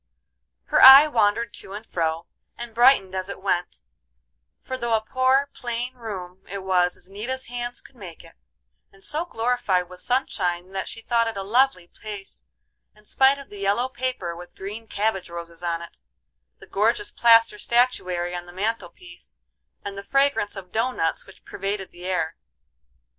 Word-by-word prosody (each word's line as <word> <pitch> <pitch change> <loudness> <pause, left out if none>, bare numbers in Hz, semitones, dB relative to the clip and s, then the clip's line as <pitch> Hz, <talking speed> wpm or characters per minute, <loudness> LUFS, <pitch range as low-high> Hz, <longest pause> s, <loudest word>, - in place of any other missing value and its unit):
Her - - +2
eye 270 +3 +12
wandered 225 -4 +1
to 195 - -10
and 210 +2 -7
fro, 165 -3 -2 0.3
and 240 -1 -8
brightened 240 -6 +5
as 185 0 -3
it 200 - -6
went; 180 -2 -2 0.8
for 260 - -6
though 235 -3 0
a 220 - +1
poor, 260 +4 +2
plain 240 +1 -4
room 190 -6 -8
it 195 -1 -5
was 180 -1 +2
as - - -6
neat 205 +5 -6
as 260 0 -2
hands 240 0 -5
could 270 - -18
make 185 -8 -11
it, - - -16 0.6
and 195 0 -14
so 310 +3 -1
glorified 225 - 0
with 180 0 -11
sunshine 185 -8 -1
that 190 -1 -3
she 225 - -7
thought 230 0 +1
it 225 -3 -4
a 195 - -3
lovely 230 -3 +2
place, 195 - -9 0.5
in 210 0 -22
spite 265 +5 +4
of 280 -1 -12
the 205 - -9
yellow 200 +6 +1
paper 250 -9 -3
with 175 +1 -12
green 210 +4 -7
cabbage 205 -4 -1
roses 170 0 -8
on 170 -1 -2
it, 170 - -13 0.6
the - - -14
gorgeous 225 - 0
plaster 230 -2 +5
statuary 180 -9 +1
on 175 0 -6
the - - -11
mantel 200 0 -2
piece, 175 - -15 0.5
and 200 0 -5
the - - -8
fragrance 275 -4 +1
of 185 -2 -9
dough 230 +3 +1
nuts 165 -9 -2
which 195 - -17
pervaded 195 0 -4
the 175 +1 -12
air. 165 -3 -1
205 Hz, 175 wpm, -24 LUFS, 180-240 Hz, 0.8 s, eye